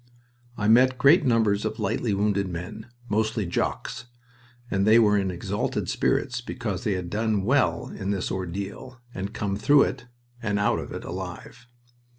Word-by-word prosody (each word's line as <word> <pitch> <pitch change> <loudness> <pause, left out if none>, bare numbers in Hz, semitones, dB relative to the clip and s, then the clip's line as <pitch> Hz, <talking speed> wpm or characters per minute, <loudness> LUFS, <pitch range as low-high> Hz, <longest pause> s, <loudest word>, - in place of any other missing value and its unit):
I 105 - 0
met 130 +3 +5
great 140 +4 +5
numbers 110 -4 +2
of 110 0 -2
the 110 - -5
lightly 110 +2 0
wounded 100 -1 +1
men, 95 +6 -7 0.2
mostly 110 -1 0
"Jocks," 85 - -3 0.7
and 95 +1 +1
they 110 +1 +7
were 105 -3 +5
in 95 -2 +1
exalted 90 -2 -2
spirits - - 0
because 115 -7 -4
they 105 - +1
had 90 -2 -4
done 110 -2 0
well 130 +6 +1
in 95 - -5
this 100 -2 -1
ordeal 100 +7 -5
and 95 +1 -3
had 105 - -15
come 100 -1 -2
through 145 +6 +5
it, 125 -1 -4 0.3
and 105 -2 -1
out 100 - +1
of - - -7
it - - -6
alive. 120 - -7
105 Hz, 170 wpm, -25 LUFS, 100-115 Hz, 0.7 s, they